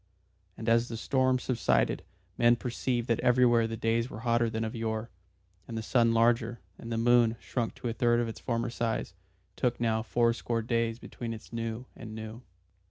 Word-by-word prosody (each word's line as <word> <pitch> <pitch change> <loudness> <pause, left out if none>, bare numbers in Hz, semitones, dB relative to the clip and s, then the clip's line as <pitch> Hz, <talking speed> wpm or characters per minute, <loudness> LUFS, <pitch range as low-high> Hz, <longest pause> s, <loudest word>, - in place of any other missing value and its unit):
And 110 - -7
as 115 +1 +4
the 115 - -5
storms 130 +1 +1
subsided 125 -3 +1 0.3
men 120 0 +5
perceived 120 0 -2
that 115 - +1
everywhere 120 -2 +4
the 115 0 -4
days 115 +2 0
were 110 - -8
hotter 115 0 +2
than 110 0 -2
of 110 - -3
yore, 110 0 -3 0.6
and 115 - -5
the 110 - -3
sun 115 0 +3
larger, 115 0 +2 0.2
and 115 - -7
the 115 - -1
moon, 120 0 +4
shrunk 120 -3 -3
to - - -5
a 115 - -1
third 120 +1 +3
of 120 - 0
its 115 - -6
former 115 -1 -2
size, 115 -2 -2 0.4
took 120 -1 0
now 110 -1 +1
fourscore 115 0 0
days 115 -1 0
between 120 -1 -6
its 110 +2 -13
new 115 +1 -3
and 110 -3 -8
new. 110 +2 -7
115 Hz, 185 wpm, -29 LUFS, 115-120 Hz, 0.6 s, men